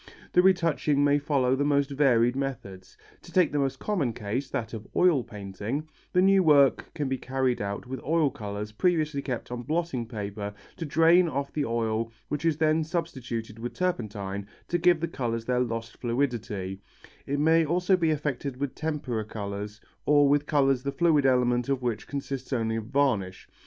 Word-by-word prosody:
The 180 - +6
retouching 165 -6 +2
may 145 0 +4
follow 135 -3 +1
the 140 - 0
most 140 -1 +2
varied 125 -4 +3
methods. 110 -9 -5 0.2
To - - -14
take 180 -4 +3
the 145 - 0
most 135 -1 0
common 165 - -1
case, 110 +7 -3
that 115 - -4
of 110 -2 -7
oil 170 -8 +4
painting, 105 +9 -5 0.2
the 180 - +3
new 195 0 +5
work 145 -5 +4
can 145 - -1
be 130 -1 -2
carried 130 -2 -1
out 100 0 -4
with 130 +1 -6
oil 155 -2 +2
colours 105 0 -6
previously 155 +2 +1
kept 125 -4 -5
on 125 0 -4
blotting 150 -4 -2
paper 105 -2 -5 0.2
to 165 - -4
drain 165 +4 +5
off 140 -1 -3
the 150 -2 0
oil 115 -1 -1 0.2
which 150 +3 -3
is 160 -3 +2
then 155 0 +2
substituted 130 -10 -4
with 120 +1 -5
turpentine 105 - -3 0.2
to 175 - +1
give 175 -1 +4
the 170 - 0
colours 115 -7 -3
their 125 0 +1
lost 115 -2 -3
fluidity; 115 -6 -2 0.5
it 140 +1 -1
may 160 +2 +4
also 180 +4 +2
be 170 -3 +1
effected 145 -3 -2
with 140 0 -3
tempera 145 -8 -3
colours 105 0 -6 0.3
or 145 -1 +5
with 145 +1 +2
colours 135 -4 +3
the 140 +1 -2
fluid 150 -1 +3
element 125 0 +2
of 135 -2 0
which 115 -4 -2
consists 135 -2 -5
only 115 -3 0
of 110 -1 -3
varnish. 115 -8 0
135 Hz, 180 wpm, -27 LUFS, 115-150 Hz, 0.5 s, The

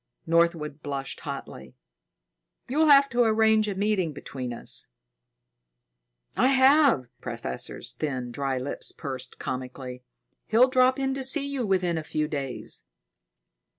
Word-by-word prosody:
Northwood 165 -3 +1
blushed 135 -2 -4
hotly. 65 -1 -8 0.9
"You'll 310 +5 +2
have 280 -1 +7
to 240 +1 +1
arrange 220 -1 +4
a 200 - -2
meeting 190 -5 0
between 130 -3 -6
us." 120 - -2 1.5
"I 250 - +4
have." 270 - +5
The - - -25
professor's - - -5
thin, 130 -5 -3
dry 135 +1 -2
lips 130 +2 -3
pursed 130 -4 -6
comically. 125 0 -6 0.5
"He'll 240 +4 +5
drop 255 0 +4
in 270 -1 0
to 270 0 -3
see 275 +2 +2
you 275 -5 -2
within 180 -4 +1
a - - -6
few 155 0 -2
days." 140 -4 -4
170 Hz, 130 wpm, -26 LUFS, -, 1.5 s, have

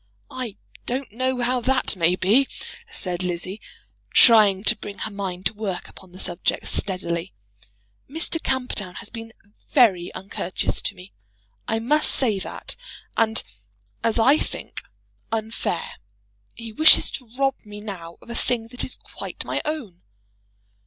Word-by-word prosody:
"I 240 -6 -5 0.3
don't 255 0 -2
know 255 +2 0
how 250 +1 +1
that 255 -2 +2
may 175 0 +3
be," 215 +9 +4 0.4
said 180 -1 -3
Lizzie, 180 +3 -3 0.5
trying 210 -5 +7
to - - +6
bring 200 - -8
her 220 - -3
mind 190 -2 -4
to - - +2
work 205 -4 -3
upon 185 -2 -14
the 180 - -12
subject 175 -1 -1
steadily. 180 -2 0 0.8
"Mr. 325 +2 -2
Camperdown 250 -8 0
has 230 - -6
been 225 -1 -7 0.4
very 200 - +4
uncourteous 185 -1 -2
to - - -1
me; 180 +2 -13 0.5
I 225 - +1
must 290 +7 +2
say 220 -7 +2
that; 190 - -3 0.4
and, 225 0 +3 0.6
as 230 0 +2
I 270 +7 +6
think, - - -4 0.5
unfair. 225 - -2 0.6
He 230 -1 -8
wishes 315 +7 +7
to 250 -4 -6
rob 270 0 +3
me 210 -1 -9
now 180 -6 -7
of - - -10
a - - -3
thing 230 -1 -1
that 250 +1 -3
is - - -2
quite - - -5
my - - -1
own." 260 - -4
220 Hz, 145 wpm, -24 LUFS, 185-250 Hz, 0.8 s, trying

